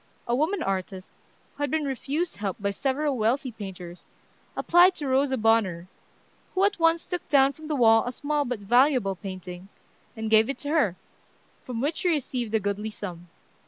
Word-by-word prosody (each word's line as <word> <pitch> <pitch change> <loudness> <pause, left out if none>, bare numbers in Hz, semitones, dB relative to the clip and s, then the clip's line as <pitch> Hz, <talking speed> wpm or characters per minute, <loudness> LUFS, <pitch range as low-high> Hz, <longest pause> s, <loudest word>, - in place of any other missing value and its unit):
A 240 - +1
woman 320 +7 0
artist, 190 -1 -4 0.4
who - - -11
had 290 - 0
been 310 +1 -1
refused 285 +5 -3
help 200 -3 -3
by 200 0 -1
several 270 +4 -1
wealthy 250 +5 0
painters, 185 -5 -9 0.5
applied 355 +2 +5
to 290 - -4
Rosa 265 0 +2
Bonheur, 215 -7 +2 0.7
who 380 +1 +4
at 405 -2 0
once 330 0 +3
took 355 -2 -5
down 275 -1 +4
from 310 +1 -12
the 305 - -1
wall 225 -3 +5
a - - -1
small 290 +3 -1
but 245 -5 -4
valuable 240 -1 +3
painting, 185 -1 -8 0.5
and 220 0 -4
gave 220 +2 +5
it 275 - -2
to 285 - -6
her, 265 - +2 0.7
from 240 -2 -5
which 295 +4 -1
she 360 - 0
received 250 -7 -2
a - - +3
goodly 205 +1 -3
sum. 175 -5 -8
245 Hz, 180 wpm, -26 LUFS, 200-290 Hz, 0.7 s, applied